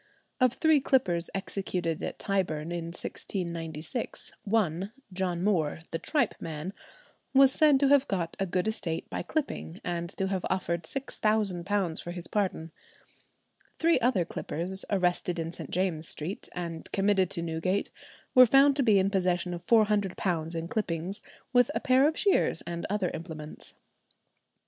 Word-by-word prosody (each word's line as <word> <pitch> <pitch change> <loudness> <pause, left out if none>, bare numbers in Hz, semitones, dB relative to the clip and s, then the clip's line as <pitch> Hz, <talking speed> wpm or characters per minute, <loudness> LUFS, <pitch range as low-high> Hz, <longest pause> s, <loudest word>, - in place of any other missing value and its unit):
Of 255 -2 +4
three 315 0 +4
clippers 185 -12 +1
executed 180 -4 -2
at - - -4
Tyburn 170 -5 -1
in 170 -1 -3
1696, 170 - -4
one, 195 -3 0 0.2
John 180 -2 -1
Moore, 160 -7 +1
"the 165 - -2
tripe 300 -3 +1
man," 160 +3 -5 0.6
was 270 0 +8
said 295 -1 +5
to 280 - +5
have 280 -1 +5
got 175 -4 -2
a 195 - 0
good 180 +3 0
estate 175 -7 -2
by - - -2
clipping, 270 - -3
and 170 -1 -3
to 190 - 0
have 190 -2 -1
offered 170 -3 -1
£6,000 205 -6 0
for - - -8
his 175 -1 -7
pardon. 185 -6 -2 1.1
Three 330 +1 +4
other 220 -8 +2
clippers 180 +4 -4
arrested 180 -2 +1
in 165 0 -3
St. - - -8
James's 175 -4 0
St., 165 +7 -5
and 170 -2 -5
committed 195 -2 +3
to 170 - -2
Newgate, 170 +4 -1 0.4
were 255 -1 +9
found 275 +3 +6
to - - +3
be 215 -4 +5
in 195 +1 +2
possession 180 -2 +1
of 175 0 -6
£400 195 -6 +2
in 165 0 -3
clippings, 185 -2 -2 0.3
with 245 0 +5
a - - +2
pair 265 0 +4
of 320 - -1
shears 400 -2 +2
and 170 0 -4
other 200 -3 0
implements. 160 -2 -7
185 Hz, 150 wpm, -29 LUFS, 170-215 Hz, 1.1 s, were